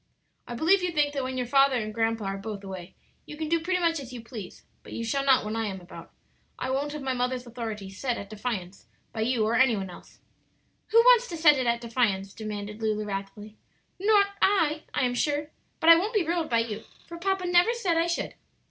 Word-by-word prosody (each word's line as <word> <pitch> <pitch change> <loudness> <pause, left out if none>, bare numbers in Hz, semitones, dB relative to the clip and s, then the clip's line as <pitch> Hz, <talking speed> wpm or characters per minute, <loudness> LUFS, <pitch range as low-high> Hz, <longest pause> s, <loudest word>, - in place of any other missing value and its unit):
"I 240 - -5
believe 350 +9 +3
you 360 - 0
think 295 -3 +1
that 280 - -1
when 255 0 -4
your 250 - -1
father 275 +1 +4
and 215 -3 -2
grandpa 225 -1 0
are 195 0 -2
both 205 -1 -6
away 190 -2 -8 0.3
you 300 - -8
can 315 0 -3
do 335 0 +3
pretty 360 +3 0
much 335 -2 +1
as 265 -3 -9
you 250 - -7
please; 225 -4 -9 0.2
but - - -12
you 230 - -4
shall 275 +5 0
not 265 -5 +4
while 215 +1 -3
I 225 -1 -1
am 190 -2 -5
about. 175 -2 -12 0.5
I 260 - -3
won't 285 +2 -1
have 300 -2 -6
my 265 -1 0
mother's 250 0 -2
authority 225 -4 -6
set 240 +5 -2
at 200 - -7
defiance 205 -4 -5 0.3
by 220 - -3
you 230 -1 +1
or 220 - 0
any 255 -3 +4
one 190 -2 -5
else." - - -14 0.7
"Who 450 - +2
wants 485 0 +6
to 340 - -6
set 300 -3 +6
it 255 - 0
at 235 0 +1
defiance?" 215 -5 0
demanded 210 0 -6
Lulu, 215 -1 -1
wrathfully. 205 +1 -6 0.4
"Not 405 +1 +5 0.2
I, 315 -6 +2
I - - +1
am 245 - 0
sure. 295 +4 -1 0.3
But 330 - +7
I - - +11
won't 420 +7 -2
be 395 -5 +2
ruled 335 0 -1
by 230 -1 +3
you, 220 -1 -5 0.2
for 335 0 -9
papa 385 0 0
never 355 +5 +4
said 380 -8 0
I 330 +1 +2
should." 340 - -2
250 Hz, 230 wpm, -27 LUFS, 215-320 Hz, 0.7 s, I